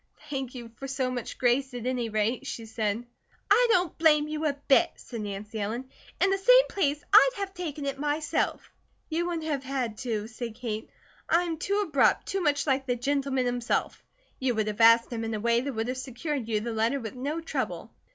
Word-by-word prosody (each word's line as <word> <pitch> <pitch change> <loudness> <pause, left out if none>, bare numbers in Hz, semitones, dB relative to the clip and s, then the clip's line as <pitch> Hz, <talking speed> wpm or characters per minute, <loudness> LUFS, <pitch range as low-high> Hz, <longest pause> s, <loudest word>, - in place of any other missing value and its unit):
"Thank 265 -2 -3
you 235 -2 -8
for 275 - -6
so 265 -1 -1
much 245 -2 -5
grace, 255 +1 +1
at 240 -1 -5
any 250 -2 -1
rate," 215 +3 0
she 230 - -5
said. 220 +1 -2 0.5
"I - - +6
don't 365 -5 +2
blame 300 -2 +5
you 310 +1 -1
a 290 - +1
bit," 275 - +5
said 235 -3 -8
Nancy 210 +2 -5
Ellen. 235 +6 -4 0.3
"In 390 - +3
the 390 - +1
same - - +6
place 295 -6 0
I'd - - +9
have 395 -1 -4
taken 310 -6 -5
it 275 -1 -3
myself." 295 +1 -1 0.4
"You 340 +2 0
wouldn't 335 -2 -3
have 285 -3 -1
had 255 -5 -3
to," 220 -4 -2
said 225 0 -6
Kate. 225 -3 -5 0.4
"I'm 335 -1 +2
too 400 +4 0
abrupt 280 -4 +3
too 390 0 -2
much 290 -4 +1
like 270 -2 0
the 245 - +1
gentleman 270 0 0
himself. 245 -1 -1 0.4
You 255 -2 0
would 215 -1 +1
have 215 +1 -3
asked 230 +1 +6
him 225 -1 -3
in 225 0 -2
a - - -3
way 235 +2 +2
that 280 +2 -3
would 225 0 -2
have 255 +1 -3
secured 260 0 -4
you 215 -2 0
the 235 +1 -3
letter 225 +5 +1
with 225 -4 -6
no 280 +6 -3
trouble." 330 - -4
260 Hz, 210 wpm, -28 LUFS, 230-300 Hz, 0.5 s, I'd